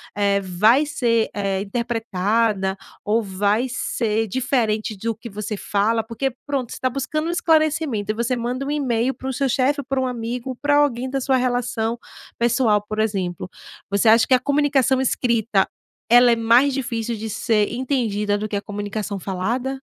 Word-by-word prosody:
eh, 200 Hz, -1 st, +2 dB
vai 210 Hz, +10 st, +3 dB
ser, 235 Hz, -6 st, +1 dB
eh, 195 Hz, -2 st, -1 dB
interpretada 215 Hz, -2 st, -1 dB, 0.3 s
ou 225 Hz, +2 st, +1 dB
vai 205 Hz, +4 st, 0 dB
ser 225 Hz, -3 st, -1 dB
diferente 220 Hz, -2 st, 0 dB
do 225 Hz, +3 st, -3 dB
que 230 Hz, +3 st, -10 dB
você 210 Hz, 0 st, -5 dB
fala? 220 Hz, +3 st, 0 dB
Porque, 230 Hz, +4 st, -2 dB
pronto, 275 Hz, -5 st, -2 dB
você -, -, -6 dB
tá 260 Hz, -, +1 dB
buscando 275 Hz, +4 st, -2 dB
um -, -, 0 dB
esclarecimento 310 Hz, -, +1 dB
e -, -, -5 dB
você 235 Hz, +3 st, 0 dB
manda 245 Hz, +2 st, -3 dB
um 275 Hz, -, -4 dB
email 260 Hz, -3 st, 0 dB
para 265 Hz, +1 st, -6 dB
o -, -, -2 dB
seu 275 Hz, +1 st, 0 dB
chefe, 280 Hz, +3 st, +1 dB
para 270 Hz, -1 st, 0 dB
o 260 Hz, -, 0 dB
amigo, 245 Hz, 0 st, -4 dB
ou -, -, -6 dB
pra 290 Hz, 0 st, +3 dB
alguém 260 Hz, -3 st, +1 dB
da 270 Hz, +1 st, -1 dB
sua 265 Hz, 0 st, +1 dB
relação 245 Hz, -2 st, -1 dB, 0.4 s
pessoal 235 Hz, -2 st, +3 dB
por 215 Hz, -, -4 dB
exemplo. 190 Hz, -5 st, -2 dB, 0.4 s
Você 200 Hz, +3 st, +1 dB
acha 225 Hz, +1 st, +5 dB
que -, -, +3 dB
a -, -, +2 dB
comunicação 275 Hz, -1 st, +2 dB
escrita 230 Hz, -5 st, +1 dB, 0.4 s
ela 245 Hz, +1 st, +7 dB
é -, -, +4 dB
mais 235 Hz, +5 st, +4 dB
difícil 235 Hz, -3 st, -2 dB
de 220 Hz, +1 st, -5 dB
ser 215 Hz, 0 st, +1 dB
entendida 225 Hz, -6 st, 0 dB
do 215 Hz, -, -3 dB
que 210 Hz, -, -4 dB
a 200 Hz, -, -1 dB
comunicação 205 Hz, 0 st, -4 dB
falada? 235 Hz, +9 st, -2 dB
230 Hz, 180 wpm, -22 LUFS, 210-260 Hz, 0.4 s, ela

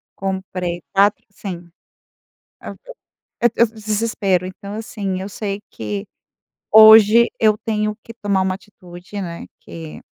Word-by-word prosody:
comprei 185 Hz, -2 st, -4 dB
quatro 200 Hz, +1 st, +3 dB
sim, 180 Hz, -3 st, -8 dB, 0.9 s
eu -, -, -8 dB
eu -, -, -11 dB, 0.6 s
eu 235 Hz, -, +5 dB
desespero, 215 Hz, -4 st, -1 dB
então 200 Hz, +2 st, -8 dB
assim, 200 Hz, -4 st, -4 dB
eu 195 Hz, -, -5 dB
sei 200 Hz, -1 st, -4 dB
que 105 Hz, -2 st, -5 dB, 0.6 s
hoje 220 Hz, +1 st, +8 dB
eu 215 Hz, -1 st, +3 dB
tenho 215 Hz, -1 st, -2 dB
que 230 Hz, -, -11 dB
tomar 205 Hz, -4 st, 0 dB
uma 185 Hz, 0 st, 0 dB
atitude, 185 Hz, 0 st, -11 dB
né. 170 Hz, -3 st, -6 dB
Que 160 Hz, -2 st, -10 dB
200 Hz, 125 wpm, -19 LUFS, 185-215 Hz, 0.9 s, hoje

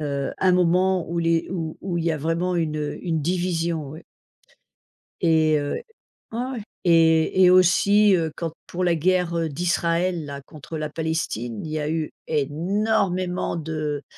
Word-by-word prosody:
heu, 140 Hz, -2 st, -2 dB
un 185 Hz, -1 st, +3 dB
moment 180 Hz, 0 st, +2 dB
où 170 Hz, +1 st, -2 dB
les 165 Hz, 0 st, +1 dB
où 165 Hz, -4 st, -4 dB
où 180 Hz, -2 st, -2 dB
il 165 Hz, -, -2 dB
y 165 Hz, -, +2 dB
a -, -, -2 dB
vraiment 165 Hz, +4 st, -1 dB
une, 160 Hz, -3 st, -1 dB
heu, 150 Hz, -1 st, -3 dB
une 160 Hz, -2 st, 0 dB
division 170 Hz, -2 st, -1 dB
ouais. 155 Hz, +3 st, -10 dB, 1.2 s
Et 160 Hz, -3 st, +3 dB
heu, 145 Hz, 0 st, -2 dB, 0.6 s
ouais, 225 Hz, -, -4 dB
ouais, 250 Hz, -2 st, -3 dB, 0.2 s
et 165 Hz, +1 st, +4 dB
et 180 Hz, -, +7 dB
aussi, 195 Hz, +3 st, +5 dB
heu, 160 Hz, -3 st, -1 dB
quand, 165 Hz, -2 st, -3 dB
pour 180 Hz, -, -4 dB
la 175 Hz, -2 st, +3 dB
guerre 170 Hz, -1 st, +1 dB
d'Israël 170 Hz, +1 st, 0 dB
là 140 Hz, -1 st, -7 dB
contre 155 Hz, +2 st, -10 dB
la 155 Hz, -1 st, -3 dB
Palestine, 150 Hz, -8 st, -3 dB
il 155 Hz, -, -6 dB
y 155 Hz, -, -2 dB
a 150 Hz, -1 st, -2 dB
eu 160 Hz, -1 st, -2 dB, 0.2 s
énormément 180 Hz, +5 st, 0 dB
de 155 Hz, -2 st, -3 dB
165 Hz, 165 wpm, -23 LUFS, 155-180 Hz, 1.2 s, et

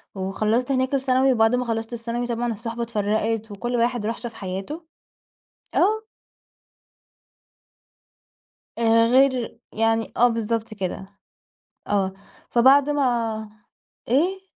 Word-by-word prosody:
وخلصت 215 Hz, +7 st, 0 dB
هناك 260 Hz, +1 st, 0 dB
الثانوي، 265 Hz, 0 st, +3 dB
وبعد 225 Hz, 0 st, +3 dB
ما 250 Hz, 0 st, -1 dB
خلصت 225 Hz, 0 st, -3 dB
الثانوي 235 Hz, +1 st, -3 dB
طبعًا 235 Hz, 0 st, -1 dB
الصُحبة 230 Hz, +2 st, -4 dB
اتفرّقت 220 Hz, 0 st, -1 dB
وكل 240 Hz, +5 st, -3 dB
واحد 240 Hz, -2 st, 0 dB
راح 225 Hz, +2 st, -2 dB
شاف 235 Hz, -1 st, -7 dB
حياته. 200 Hz, -, -6 dB, 0.9 s
آه. 435 Hz, +3 st, +2 dB, 2.7 s
آآ، 230 Hz, 0 st, +4 dB
غير 260 Hz, -3 st, +2 dB
يعني 225 Hz, 0 st, +1 dB
آه، 245 Hz, -, +6 dB
بالضبط 230 Hz, -1 st, -2 dB
كده. 190 Hz, -1 st, -4 dB, 0.8 s
آه، 195 Hz, -2 st, 0 dB, 0.4 s
فبعد 270 Hz, +4 st, +5 dB
ما 230 Hz, -6 st, 0 dB, 0.6 s
إيه؟ 355 Hz, +10 st, +1 dB
230 Hz, 105 wpm, -23 LUFS, 220-255 Hz, 2.7 s, آه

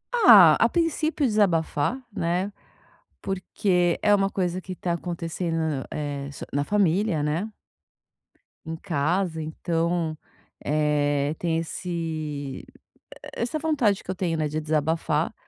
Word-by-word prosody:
Ah, 200 Hz, -, +8 dB
a 230 Hz, -, +4 dB
princípio 320 Hz, -2 st, 0 dB
desabafar, 195 Hz, -, +1 dB, 0.2 s
né, 175 Hz, +4 st, -1 dB, 0.7 s
porque 180 Hz, -2 st, 0 dB
é 205 Hz, -, +4 dB
uma 195 Hz, -1 st, +3 dB
coisa 185 Hz, -2 st, -1 dB
que 185 Hz, 0 st, -7 dB
tá 175 Hz, -, -3 dB
acontecendo 170 Hz, 0 st, -3 dB
na 155 Hz, -5 st, -1 dB
eh, 145 Hz, -2 st, -4 dB, 0.2 s
na 145 Hz, +1 st, 0 dB
família, 195 Hz, -3 st, +1 dB
né. 165 Hz, +9 st, -2 dB, 1.1 s
Em 160 Hz, -, -4 dB
casa. 165 Hz, +1 st, -1 dB
Então, 165 Hz, +1 st, -1 dB, 0.5 s
eh, 145 Hz, -1 st, +1 dB
tem 165 Hz, -2 st, -1 dB
esse 165 Hz, +2 st, -5 dB
e 155 Hz, -5 st, -4 dB, 0.8 s
e -, -, -6 dB
essa 245 Hz, +6 st, -1 dB
vontade 275 Hz, -11 st, +1 dB
que -, -, -18 dB
eu -, -, -4 dB
tenho, 175 Hz, -3 st, -1 dB
né, 155 Hz, -1 st, 0 dB
de 150 Hz, +1 st, -3 dB
desabafar. 155 Hz, +2 st, 0 dB
170 Hz, 130 wpm, -25 LUFS, 155-195 Hz, 1.1 s, Ah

